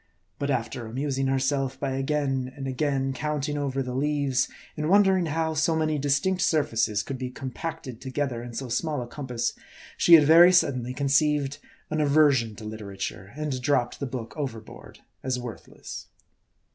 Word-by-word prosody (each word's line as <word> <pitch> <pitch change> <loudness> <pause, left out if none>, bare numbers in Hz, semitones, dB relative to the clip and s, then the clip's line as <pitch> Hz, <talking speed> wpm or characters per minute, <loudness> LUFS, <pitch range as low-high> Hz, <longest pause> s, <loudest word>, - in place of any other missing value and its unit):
But 140 0 -1
after 120 -2 -2
amusing 135 +3 -1
herself 135 0 0
by 140 -2 -2
again 135 -1 -1
and 135 -1 -4
again 135 0 0
count 150 +1 -2
ing 145 - -2
over 135 -2 -1
the 125 -1 -5
leaves, 140 -1 +1 0.3
and 155 +1 -2
wondering 190 -3 +4
how 160 +1 -1
so 155 +1 +1
many 155 -1 0
distinct 145 +7 +1
surfaces 115 - +1
could 135 -2 -5
be 130 -1 -3
compacted 130 0 -6
together 130 -2 -2
in 120 -1 -8
so 130 +2 -4
small 145 +2 -1
a - - -9
compass, 125 -3 -3 0.4
she 170 - +8
had 155 - +7
very 165 +4 +8
suddenly 130 -8 +2
conceived 145 0 +1 0.3
an 155 0 +1
aversion 140 -7 +3
to 110 - -10
literature, 100 -2 -6
and 150 -4 -3
dropped 125 -2 +1
the 140 - -3
book 120 -3 -6
overboard 125 -8 -7 0.2
as 130 -1 -1
worthless. 120 -4 -8
135 Hz, 160 wpm, -26 LUFS, 125-150 Hz, 0.4 s, she